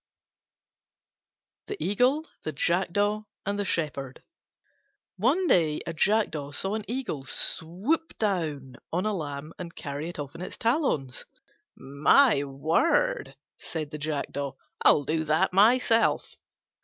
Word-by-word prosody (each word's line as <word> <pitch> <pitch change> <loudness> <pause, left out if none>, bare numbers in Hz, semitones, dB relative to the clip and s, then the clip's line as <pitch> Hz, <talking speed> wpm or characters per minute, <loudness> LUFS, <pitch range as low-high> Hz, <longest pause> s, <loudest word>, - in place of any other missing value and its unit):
THE 415 0 -5
EAGLE, 250 +10 +1 0.2
THE 155 - -4
JACKDAW, 205 +7 0 0.2
AND 200 +1 -2
THE 205 - -1
SHEPHERD 140 -7 -3 0.9
One 275 - +2
day 160 - +3
a 170 - -4
Jackdaw 160 -6 0
saw 195 +7 -1
an 215 -1 -3
Eagle 230 - -3
swoop 200 - +1
down 155 - -2
on 180 +4 -1
a 215 - 0
lamb 150 -3 -5
and 170 -2 -7
carry 145 +2 -5
it 175 - -7
off 145 -2 -6
in 165 - -9
its 185 - -7
talons. 230 - -1 0.5
"My 145 - +4
word," 160 - +1 0.2
said 155 -3 -5
the 150 - -6
Jackdaw, 145 -2 -3 0.3
"I'll 145 - +6
do 160 +3 -1
that 160 +5 +2
myself." 225 +3 +3
170 Hz, 125 wpm, -27 LUFS, 145-215 Hz, 0.9 s, I'll